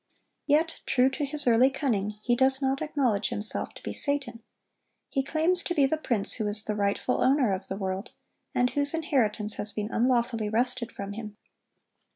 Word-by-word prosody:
Yet, 310 +3 +2
true 260 +1 +3
to 290 +2 -2
his 290 +1 -3
early 245 +2 +5
cunning, 220 -7 -2
he 240 - +2
does 265 +1 +2
not 270 0 -1
acknowledge 255 -9 0
himself 210 +1 0
to - - -12
be - - -4
Satan. 270 -5 -1 0.7
He 270 - +1
claims 325 +6 0
to 350 - -3
be 285 - +4
the 270 - +1
prince 235 -10 +1
who 215 -3 -2
is 210 0 +2
the 215 - -3
rightful 205 +4 -1
owner 260 -6 +3
of 190 0 -5
the 190 - -5
world, 190 +2 -4 0.4
and 250 0 +2
whose 285 +2 +5
inheritance 235 - 0
has 210 - -5
been 210 +1 -4
unlawfully 235 -2 +1
wrested 245 +1 0
from 200 0 -7
him. 210 -1 -8
250 Hz, 185 wpm, -27 LUFS, 210-280 Hz, 0.7 s, early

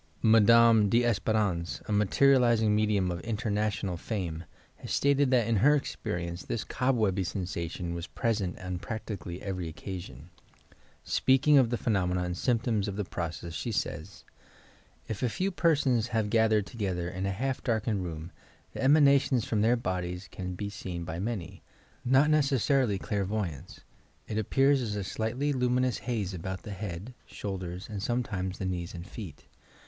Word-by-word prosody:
Madame 115 -1 +6
D'Espcrance, 110 -6 +1
a - - -4
materializing 115 +1 +4
medium 105 -4 +1
of 85 0 -5
in 115 -2 -2
ternational 105 -4 -1
fame, 85 -7 -4 0.3
has - - -8
stated 140 -1 +3
that 125 -3 +3
in 115 -1 +1
her 145 +8 +5
experience 85 -10 -3
this 115 - -3
cobwebby 110 -7 +1
sensation 85 -1 -4
was 85 +1 -5
present 105 -6 -1
on 90 -1 -5
practically 100 -4 -6
every 95 -3 -3
TOUR 80 - -15
PSYCHIC - - -19
POWEES 95 -2 -4
occasioD. 65 +6 -13 0.8
Speaking 135 +3 +4
of 125 -3 +3
the 120 - 0
phenomena 90 -6 0
and 90 0 -3
symptoms 115 -2 0
of 100 - -3
the 105 -1 -2
process, 85 -1 -5
she 115 - -3
says: 85 - -4 0.4
— 80 +2 -30
"If 110 - -4
a 125 - +1
few 190 - -1
persons 140 - +2
have 110 -3 -1
gathered 110 -2 +3
together 95 -7 -3
in 95 +2 -3
a - - 0
half 130 +7 -2
darkened 110 -4 0
room, 80 0 -6 0.4
the - - -5
emanations 140 -4 +4
from 110 -2 0
their 115 +3 +4
bodies 90 -3 -3
can 90 -1 -5
be 100 +2 -4
seen 90 -3 -5
by 85 0 -5
many 100 -3 -4 0.2
— - - -32
not 135 +4 +4
necessarily 135 -6 +2
clairvoyants. 95 -7 -3 0.5
It 110 - -2
ap 110 - -4
pears 135 0 +4
as 105 -4 -3
a 100 - -2
slightly 120 +9 -1
luminous 125 -3 +1
haze 110 -6 -2
about 95 +2 -5
the 105 - -7
bead, 100 +4 -5
shoul 95 -2 -5
ders 90 +1 -6
and 105 -3 -5
sometimes 100 -5 -2
the 95 - -4
knees 90 -1 -3
and 85 0 -7
feet. 90 -8 -9
105 Hz, 170 wpm, -29 LUFS, 90-120 Hz, 0.8 s, Madame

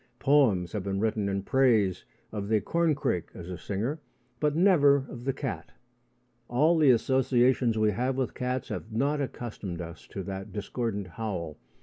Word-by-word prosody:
Poems 110 - +3
have 105 - -2
been 95 0 -2
written 110 -2 0
in 100 0 -2
praise 110 -7 +2 0.3
of 105 -2 -4
the 110 0 +3
corncrake 150 - 0
as 90 +1 -8
a - - -4
singer, 115 - -3 0.4
but 150 -1 +1
never 165 -6 +5
of 120 -1 -9
the 135 - +2
cat. 135 -1 -5 0.7
All 150 +8 +3
the 155 -4 +5
associations 125 -1 +3
we 110 -1 +3
have 125 +6 -1
with 130 -2 -1
cats 125 -1 -3
have 110 - -5
not 140 +6 0
accustomed 110 -9 -5
us 85 0 -8
to 95 - -6
that 95 0 -6
discordant 105 0 -3
howl. 90 -5 -5
115 Hz, 160 wpm, -28 LUFS, 100-135 Hz, 0.7 s, never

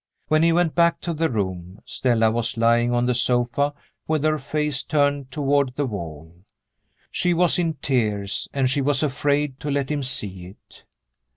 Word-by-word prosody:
When 155 0 +4
he 165 +1 +4
went 170 -1 +2
back 170 -1 +3
to 170 - -3
the 165 +1 0
room, 95 -4 -4
Stella 115 -3 +1
was 115 0 -2
lying 120 +1 +3
on 120 0 +1
the 125 - +2
sofa 125 +4 +1 0.3
with 155 -2 0
her 155 0 +2
face 150 0 -2
turned 145 -3 0
toward 140 -2 0
the 145 - 0
wall. 85 - -7 0.7
She 175 -1 +1
was 175 +1 +2
in 165 -2 0
tears, 105 -8 -1
and 135 -2 +1
she 135 +2 0
was 140 +1 +1
afraid 145 -1 0
to 150 - -4
let 140 0 -1
him 145 -1 -1
see 100 -9 -4
it. 95 - -18
135 Hz, 175 wpm, -23 LUFS, 115-150 Hz, 0.7 s, When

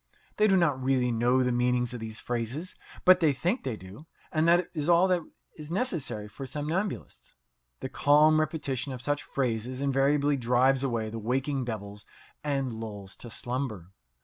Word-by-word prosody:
They 215 - +5
do 195 -2 +4
not 145 -7 +1
really 130 -2 +2
know 120 +3 +2
the 125 - +1
meaning 125 0 +2
of 125 0 -4
these 110 0 -6
phrases, 125 +11 -3 0.3
but 185 0 +8
they 160 -5 +3
think 175 - -1
they 125 -5 -3
do, 100 - -12 0.2
and 155 0 +2
that 175 +1 +4
is 155 -1 -2
all 175 +2 +5
that 180 -2 +2 0.4
is 150 0 -8
necessary 165 - -2
for 135 +6 -8
somnambulists. 160 +8 -4 0.5
The - - -4
calm 155 +2 +5
repetition 145 -4 -2
of 125 - -7
such 145 +1 0
phrases 125 -1 -2
invariably 140 +1 +2
drives 130 +2 +3
away 115 -5 -1
the 115 - -5
waking 130 +4 -1
devils 105 -3 -6 0.4
and 135 -3 -1
lulls 105 -3 -6
to 120 - -8
slumber. 115 -6 -4
135 Hz, 170 wpm, -28 LUFS, 120-155 Hz, 0.5 s, but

